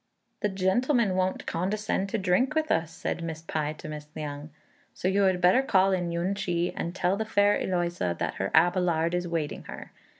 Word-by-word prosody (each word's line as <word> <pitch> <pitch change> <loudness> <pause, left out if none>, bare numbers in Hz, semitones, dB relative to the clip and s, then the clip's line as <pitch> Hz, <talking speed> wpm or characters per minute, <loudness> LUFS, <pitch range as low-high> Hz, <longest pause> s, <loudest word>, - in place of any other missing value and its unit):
"The 210 - 0
gentleman 200 +3 +1
won't 185 0 -1
condescend 195 +2 -1
to 225 - -1
drink 200 +9 +1
with 315 0 +1
us," 165 -1 +1
said - - -4
Miss 160 -1 -5
Pai 155 -1 -2
to 155 - -10
Miss 150 -1 -7
Liang, 150 -1 -6 0.5
"so - - -2
you 195 +2 +2
had 185 -1 +2
better 180 +8 +5
call 195 -7 +3
in 175 -2 0
Yün 170 +3 -1
ch'i, 175 -3 -1
and 170 +2 -4
tell 185 0 +1
the 220 - 0
fair 205 -1 +3
Eloïsa 175 - -1
that - - -2
her 95 - 0
Abelard 175 -1 +3
is 180 0 0
awaiting 165 -3 -3
her." - - -9
180 Hz, 195 wpm, -27 LUFS, 165-195 Hz, 0.5 s, better